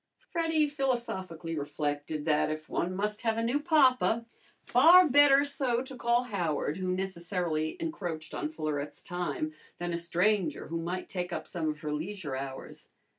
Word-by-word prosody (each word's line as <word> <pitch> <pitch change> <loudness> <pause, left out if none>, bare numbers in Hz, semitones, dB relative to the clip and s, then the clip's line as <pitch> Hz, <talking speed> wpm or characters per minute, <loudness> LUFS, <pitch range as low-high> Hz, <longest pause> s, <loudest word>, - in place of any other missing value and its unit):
Freddy 325 -2 +2
philosophically 235 - -2
reflected 145 0 -3
that 150 -2 +2
if 155 0 -5
one 180 +2 -2
must 210 +2 -2
have 225 -1 0
a 230 - 0
new 245 +5 +1
papa, 260 -7 +3 0.4
far 360 +1 +7
better 285 0 +6
so 260 -4 +1
to 265 0 -9
call 240 0 +2
Howard, 170 - -1
who 185 -1 -3
necessarily 175 -4 -2
encroached 175 - -4
on 150 - -2
Florette's 155 -2 -4
time, 245 - -3 0.2
than 175 0 -3
a 170 - -1
stranger 175 -1 0
who 165 +1 -2
might 180 +2 -4
take 180 -1 -4
up - - -4
some 160 -3 -2
of 150 0 -5
her 150 -2 -3
leisure 160 -2 -4
hours. 135 0 -7
185 Hz, 160 wpm, -30 LUFS, 155-250 Hz, 0.4 s, far